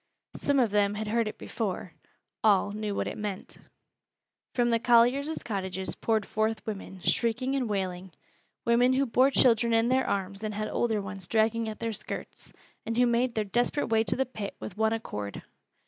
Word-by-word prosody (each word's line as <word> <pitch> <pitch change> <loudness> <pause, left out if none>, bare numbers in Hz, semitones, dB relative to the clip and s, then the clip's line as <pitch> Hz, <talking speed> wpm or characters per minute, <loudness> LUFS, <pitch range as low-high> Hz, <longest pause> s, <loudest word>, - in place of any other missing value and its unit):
Some 285 -1 +1
of 235 -5 +3
them 205 0 +2
had 215 0 -3
heard 230 0 +1
it 215 - -6
before 190 -6 -4 0.5
all 205 -2 +4
knew 210 -1 -3
what - - -1
it - - -5
meant. 205 -3 -5 1.0
From 240 -1 +2
the 230 - +3
colliers' 245 +6 +3
cottages 190 -3 -3
poured 220 -2 0
forth 220 +1 -1
women, 195 -3 -6
shrieking 250 +3 +1
and 255 -4 -1
wailing, 185 -2 -3 0.5
women 245 +2 +4
who 270 +1 +2
bore 255 +2 +4
children 235 -3 +4
in 225 +1 +3
their 260 0 +2
arms 195 +1 -2
and 215 -1 -3
had 215 +1 -2
older 225 -3 0
ones 195 -3 -7
dragging 225 +1 +1
at 215 - -6
their 230 -1 -3
skirts, - - -7 0.3
and 230 +1 -3
who 245 - +5
made 240 +1 +1
their 215 - +1
desperate 240 +7 0
way 225 0 +3
to - - 0
the 265 - +1
pit 215 -6 -6
with 195 - -7
one 220 +1 +2
accord. 105 - -5
220 Hz, 185 wpm, -28 LUFS, 205-240 Hz, 1.0 s, who